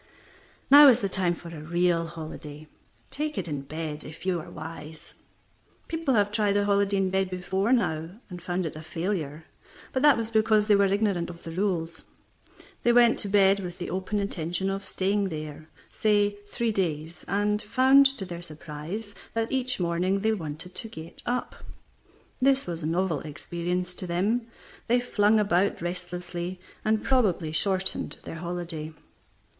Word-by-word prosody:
Now 290 +1 +11
is 250 -3 +6
the 200 - +1
time 185 -2 +1
for 170 - -10
a 160 -3 -8
real 170 +1 +1
holiday. 155 -2 -8 0.4
Take 300 +1 -2
it - - -2
in 145 -3 -3
bed, 155 +1 -4
if 155 +4 -10
you 185 -2 +1
are - - -11
wise. 155 -1 -9 0.7
People 325 -6 0
have 205 -1 +3
tried 210 -1 +2
a 205 - +2
holiday 200 0 +2
in 190 -1 +1
bed 190 0 +1
before 190 +4 -1
now, 160 -10 +1 0.2
and 180 -2 -8
found 180 0 -2
it 155 - -4
a 155 - -7
failure, 160 -2 -3 0.5
but 260 - +1
that 295 -2 +6
was 230 0 -3
because 215 -1 +4
they 210 -1 +5
were 200 0 +4
ignorant 195 -4 +1
of 170 -1 -10
the 165 - -6
rules. 170 -3 -2 0.8
They 240 - +4
went 240 -1 +5
to 205 - -3
bed 195 0 +5
with 180 -2 -6
the 175 - -5
open 190 +3 -2
intention 190 -1 -1
of 195 0 -3
staying 200 +2 0
there, 155 -1 -7 0.2
say, 205 -1 +2 0.2
three 235 +2 -1
days, 165 -4 -2
and 210 +2 +1
found 265 +5 +6
to 270 -8 -4
their 175 -2 -7
surprise 165 +6 -7 0.2
that 225 0 0
each 255 -3 0
morning 180 +3 +1
they 220 +1 +2
wanted 165 -1 -6
to 225 - -5
get 160 -4 -10
up. 250 +1 -2 0.8
This 270 +1 +3
was 170 -1 -4
a 155 - -2
novel 170 -2 0
experience 175 +4 -3
to 180 - -5
them, 210 +7 0 0.4
they 245 +2 +4
flung 215 -3 +3
about 200 -1 +2
restlessly, 180 0 -5 0.2
and 215 0 +1
probably 195 -11 +2
shortened 190 +3 0
their 165 - -7
holiday. 170 -3 -5
185 Hz, 170 wpm, -27 LUFS, 165-210 Hz, 0.8 s, Now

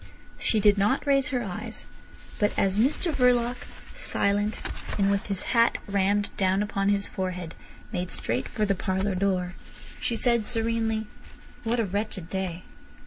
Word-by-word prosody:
She 220 - +2
did 205 -1 +5
not 210 +9 +2
raise 275 -2 +3
her 255 -4 -1
eyes, 215 +3 -5 0.5
but 205 - +1
as 195 +1 +2
Mr 300 +8 +2
Verloc, 245 -2 +3 0.4
silent, 205 +1 0 0.4
and 200 -1 +3
with 200 0 0
his 195 -3 -1
hat 230 -1 +4
rammed 200 +1 +1
down 190 +1 +2
upon 200 -1 0
his 200 0 +1
forehead, 180 -3 -4 0.4
made 180 0 -2
straight - - -1
for 215 - -1
the 200 - +2
parlour 190 +1 -1
door, 185 -1 0 0.5
she 235 - 0
said 235 -1 +2
serenely: 225 -2 0 0.6
"What 235 +1 0
a 225 - +2
wretched 200 -3 -3
day. 185 -2 -3
205 Hz, 150 wpm, -27 LUFS, 190-230 Hz, 0.6 s, did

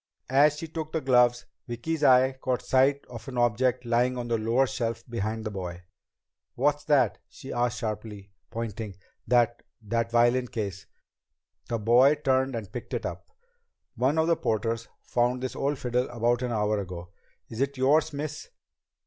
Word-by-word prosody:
As 145 +2 +5
she 165 - -5
took 155 -1 -5
the 160 - +1
gloves, 125 -3 +3 0.2
Vicki's 145 +7 -3
eye 130 -1 +6
caught 125 -1 -1
sight 135 +2 +2
of 120 -2 -10
an 130 -2 -6
object 120 +1 +1
lying 125 +2 +1
on 120 -1 -4
the 115 - +2
lower 115 +5 +2
shelf 115 -2 -3
behind 110 -1 -3
the 110 - -3
boy. 90 -2 -6 0.7
"What's 145 +3 +1
that?" 145 -3 +3
she 135 - -9
asked 120 0 0
sharply, 105 -3 -5 0.2
pointing. 110 -3 -5 0.3
"That 120 -1 +3 0.2
that 115 +2 -1
violin 120 +2 +3
case?" 100 -5 -5 0.8
The 115 - 0
boy 120 +6 +5
turned 130 -3 +1
and 110 -4 -6
picked 120 - -5
it - - -3
up. - - -6 0.6
"One 130 +5 +1
of 160 - +3
the 170 0 +3
porters 115 -1 -1 0.2
found 125 +1 0
this 130 - -3
old 140 +1 -1
fiddle 125 +1 -1
about 120 0 +1
an 125 -1 -2
hour 105 -1 +1
ago. 90 -2 -7 0.4
Is 115 +2 -6
it 140 0 -1
yours, 150 +5 +3
miss?" 150 +1 -5
120 Hz, 165 wpm, -27 LUFS, 115-135 Hz, 0.8 s, eye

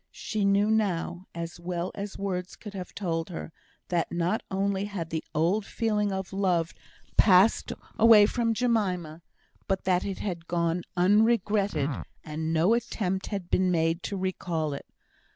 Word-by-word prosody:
She 215 -2 -2
knew 200 +2 +3
now, 190 -4 0
as 170 0 -5
well 175 0 -3
as 200 0 -6
words 185 -2 -3
could 210 -2 -10
have 185 -2 -7
told 165 -4 -2
her, 165 -1 -6 0.4
that 175 -2 0
not 175 +5 0
only 195 0 0
had 190 -6 -5
the 160 -1 -2
old 175 +7 +2
feeling 210 -2 0
of 190 0 -4
love 180 -4 +1 0.4
passed 195 +1 +5 0.3
away 220 -2 +8
from 230 +1 0
Jemima, 185 -9 0 0.5
but 190 -1 0
that 180 -1 +2
it 195 -2 -3
had 170 -5 -4
gone 170 0 0 0.2
unregretted, 205 -5 +3 0.3
and 160 +1 -3
no 165 +7 +3
attempt 210 -5 -1
had 195 -4 -5
been 185 0 +3
made 165 0 +1
to 200 - -4
recall 170 -5 -2
it. 140 - -7
185 Hz, 150 wpm, -28 LUFS, 170-205 Hz, 0.5 s, away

